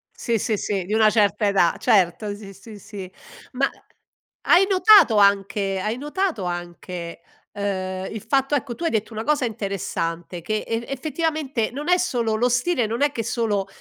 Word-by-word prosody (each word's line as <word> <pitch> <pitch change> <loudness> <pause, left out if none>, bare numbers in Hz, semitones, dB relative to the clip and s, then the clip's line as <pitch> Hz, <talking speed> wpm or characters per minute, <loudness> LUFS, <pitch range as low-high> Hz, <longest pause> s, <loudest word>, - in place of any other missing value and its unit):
Sì, 230 -2 -1
sì, 215 +1 -1
sì, 195 -2 -2
di 205 - -6
una 215 -1 +5
certa 210 0 +2
età 190 -4 +3
certo 205 -2 +2
sì, 200 -2 -11
sì, 205 +2 -12
sì. 195 -3 -9 0.4
Ma 270 +2 +1 0.7
hai 365 +3 +5
notato 390 - +6
anche 200 -1 +2
hai 215 +4 -2
notato 295 - -2
anche, 175 -1 -6 0.3
ehm, 190 -2 -3
il 215 - -6
fatto 270 +2 +2
ecco 255 -3 -2
tu 340 - -7
hai 330 - +1
detto 220 +1 -2
una 220 +1 -4
cosa 295 -3 +1
interessante, 175 -5 -4
che 215 +3 -2
e 230 +1 -2
effettivamente 290 -3 -2
non 290 +5 -6
è 360 - +5
solo 235 -11 0
lo 245 +3 +2
stile 245 0 +1
non 230 +5 -3
è 290 - +4
che 230 -4 -3
solo 220 -5 -1
220 Hz, 175 wpm, -23 LUFS, 195-260 Hz, 0.7 s, notato